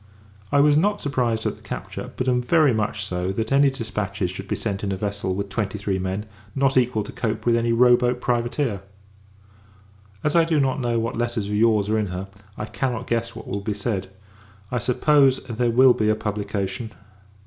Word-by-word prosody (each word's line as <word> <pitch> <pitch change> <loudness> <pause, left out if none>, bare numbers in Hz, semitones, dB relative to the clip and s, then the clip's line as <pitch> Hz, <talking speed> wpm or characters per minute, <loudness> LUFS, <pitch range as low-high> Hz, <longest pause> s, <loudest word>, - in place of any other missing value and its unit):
I 145 - +3
am 145 +1 +5
not 205 +2 +1
surprised 120 -6 -1
at - - -1
the - - -20
capture; - - -6
but 130 - -2
am 125 -1 +2
very 150 +1 +4
much 105 -1 -1
so, 90 -1 -2
that 110 +3 -3
any 140 +1 +5
dispatches 105 -7 -3
should 95 +1 -8
be - - -1
sent 100 -3 -3
in 100 - -1
a 95 - -2
vessel 100 -2 -2
with 100 +1 -3
twenty 105 -1 -2
three 100 -2 -2
men, 95 +3 -3 0.3
not 135 0 +2
equal 125 -4 +2
to - - -8
cope 110 -2 -3
with 120 -1 +4
any 115 0 +1
row 120 +1 +6
boat 125 0 0
privateer. 120 -2 -1 1.4
As 150 - +1
I 170 - +6
do 160 -2 +1
not 135 0 +1
know 120 -1 0
what 115 0 -3
letters 120 -3 -1
of 105 - -3
your's 105 -1 +3
are 110 +1 +1
in 105 - -1
her, 90 +1 -5 0.3
I 105 - -3
cannot 125 +1 -3
guess 115 0 -2
what - - -9
will 100 +1 -3
be 105 0 -3
said. 100 -2 -3 0.6
I 125 - 0
suppose, 135 +3 +3
there 120 -1 -1
will 125 +2 +6
be 110 -3 +1
a 110 - +3
publication. 105 +1 -3
115 Hz, 205 wpm, -23 LUFS, 100-125 Hz, 1.4 s, row